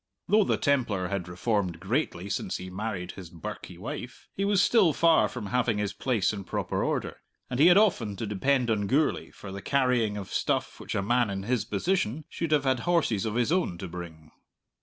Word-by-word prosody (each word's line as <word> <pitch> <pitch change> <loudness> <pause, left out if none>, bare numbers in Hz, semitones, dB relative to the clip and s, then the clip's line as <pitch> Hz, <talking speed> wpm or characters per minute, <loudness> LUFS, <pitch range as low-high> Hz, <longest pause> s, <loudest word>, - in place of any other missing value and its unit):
Though 215 0 +5
the - - +1
Templar 115 - +1
had 95 -2 -3
reformed 90 -1 -1
greatly 95 - -1
since 100 - -2
he 95 0 -8
married 95 -2 -4
his 90 -3 -10
birkie 85 -2 -8
wife, - - -7
he 195 - -2
was 200 -1 +3
still 200 -5 +4
far 160 -9 +4
from - - -6
having 115 0 +1
his 105 -1 -1
place 115 -7 0
in 100 -2 -5
proper - - -2
order, - - -2 0.3
and 125 - -2
he 155 - +7
had 180 +1 +7
often 150 - +2
to 110 - -4
depend 120 +4 +1
on 100 -2 0
Gourlay 145 +7 +1
for 95 - -10
the 100 +1 -6
carrying 125 -6 +1
of 100 -2 -7
stuff - - -1
which - - -5
a 100 - 0
man 120 +1 +2
in 95 -1 -3
his 115 -1 0
position 140 - -1
should 165 - -3
have 150 -2 +3
had 130 -3 +2
horses 145 - +1
of 110 - -3
his 120 +4 +1
own 175 - +1
to 95 - -6
bring. 80 -3 -9
110 Hz, 205 wpm, -28 LUFS, 95-140 Hz, 0.3 s, he